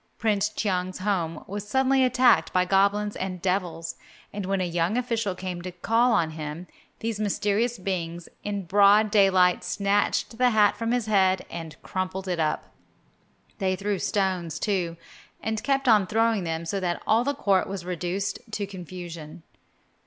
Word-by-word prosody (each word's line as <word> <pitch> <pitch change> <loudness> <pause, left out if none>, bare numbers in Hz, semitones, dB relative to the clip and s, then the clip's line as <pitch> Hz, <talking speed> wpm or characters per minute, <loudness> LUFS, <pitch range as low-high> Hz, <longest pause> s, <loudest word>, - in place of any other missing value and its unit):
Prince 210 -2 +1
Cheung's 185 -4 -2
home 175 -5 -2
was 205 +1 -6
suddenly 265 +3 +3
attacked 250 0 +4
by 180 0 +2
goblins 200 +2 +2
and 185 -1 -4
devils, 175 -3 -2 0.4
and 200 -2 -4
when 195 0 0
a - - +1
young 175 +4 0
official 230 -6 -1
came 180 -1 -5
to 185 +1 -6
call 230 +7 +2
on 165 -6 +2
him, 155 +2 -6 0.4
these 225 -2 -2
mysterious 215 +3 0
beings 175 -3 -4 0.2
in 200 -2 -3
broad 205 +3 +5
daylight 190 -4 +4
snatched 200 +4 0
the 250 0 +5
hat 215 -3 +4
from 230 +2 -2
his 245 -2 0
head 190 -3 +2
and 165 -2 -7
crumpled 185 0 -3
it 180 -2 -1
up. 155 -1 -1 0.9
They 190 -2 +1
threw 200 0 -2
stones, 185 -5 -1
too, 180 -5 -1 0.4
and 220 -1 -2
kept 275 -1 0
on 210 -5 +5
throwing 225 -2 +1
them 165 0 -3
so 195 +4 -2
that 175 -2 -1
all 225 +2 +3
the 285 +2 -1
court 195 -7 +2
was 195 -3 -5
reduced 180 +2 -2
to 205 - -1
confusion. 175 -4 -9
195 Hz, 160 wpm, -26 LUFS, 180-210 Hz, 0.9 s, broad